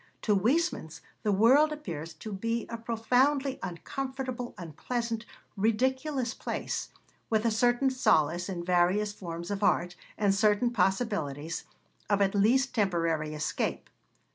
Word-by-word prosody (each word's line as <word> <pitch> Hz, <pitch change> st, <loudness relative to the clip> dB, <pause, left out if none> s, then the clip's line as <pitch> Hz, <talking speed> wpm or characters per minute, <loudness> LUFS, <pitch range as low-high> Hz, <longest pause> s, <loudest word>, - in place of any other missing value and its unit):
To 210 Hz, -, +3 dB
Huysmans 240 Hz, -, 0 dB, 0.2 s
the 210 Hz, -, +1 dB
world 260 Hz, +10 st, +5 dB
appears 170 Hz, -, -6 dB
to 215 Hz, +6 st, -7 dB
be 230 Hz, +4 st, -2 dB
a 230 Hz, -, -4 dB
profoundly 255 Hz, +4 st, +1 dB
uncomfortable, 255 Hz, +6 st, -5 dB
unpleasant, 230 Hz, -, -4 dB, 0.3 s
ridiculous 260 Hz, +5 st, 0 dB
place, -, -, -4 dB, 0.4 s
with 220 Hz, 0 st, +1 dB
a 230 Hz, -, +3 dB
certain 245 Hz, +4 st, +2 dB
solace 175 Hz, -, +2 dB
in 175 Hz, -2 st, -4 dB
various 180 Hz, +4 st, +2 dB
forms 170 Hz, -2 st, -6 dB
of 200 Hz, 0 st, -2 dB
art, 180 Hz, -3 st, +2 dB, 0.2 s
and 200 Hz, -2 st, +3 dB
certain 210 Hz, +4 st, +3 dB
possibilities 180 Hz, -, -1 dB, 0.4 s
of 205 Hz, -1 st, +3 dB
at 195 Hz, -1 st, +2 dB
least 240 Hz, +7 st, +3 dB
temporary 165 Hz, -7 st, 0 dB
escape. 150 Hz, 0 st, -2 dB
210 Hz, 125 wpm, -29 LUFS, 180-245 Hz, 0.4 s, world